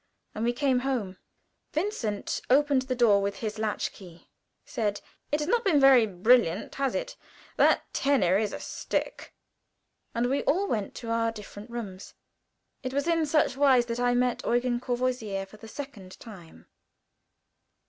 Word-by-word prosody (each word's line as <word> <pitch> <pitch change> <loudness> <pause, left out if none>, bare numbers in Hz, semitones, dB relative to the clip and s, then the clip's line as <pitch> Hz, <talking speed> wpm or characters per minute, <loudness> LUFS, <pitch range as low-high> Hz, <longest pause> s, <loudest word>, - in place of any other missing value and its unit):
And 215 - -4
we 240 - +2
came 255 0 +1
home; 245 -8 -2 0.6
Vincent 300 - -2
opened 280 0 +4
the 260 -1 -2
door 220 -5 +4
with 200 0 -2
his 215 -1 -5
latch 215 -1 -1
key, 175 -3 -15 0.4
said, 205 -3 -2 0.3
"It 295 - +1
has 295 - -2
not 475 +5 +2
been 335 -8 +3
very 265 -4 +6
brilliant, 200 -1 +2
has 275 -1 -1
it? - - -3 0.4
That - - +4
tenor 200 -10 +2
is 210 -2 -1
a - - -6
stick," - - -4 0.8
and 235 +1 +1
we 275 +3 0
all 360 +8 +2
went 210 - -2
to 230 -2 -5
our 230 0 +1
different 210 0 -10
rooms. 205 -6 -7 0.7
It 255 0 -5
was 280 +1 0
in 330 -2 +2
such 300 -3 +2
wise 265 -3 +4
that 235 0 -4
I 245 0 +2
met 250 0 +1
Eugen 240 0 +1
Courvoisier 245 -6 -2
for 195 +2 -16
the 225 - -12
second 220 -8 -9
time. 175 - -13
240 Hz, 160 wpm, -27 LUFS, 210-270 Hz, 0.8 s, very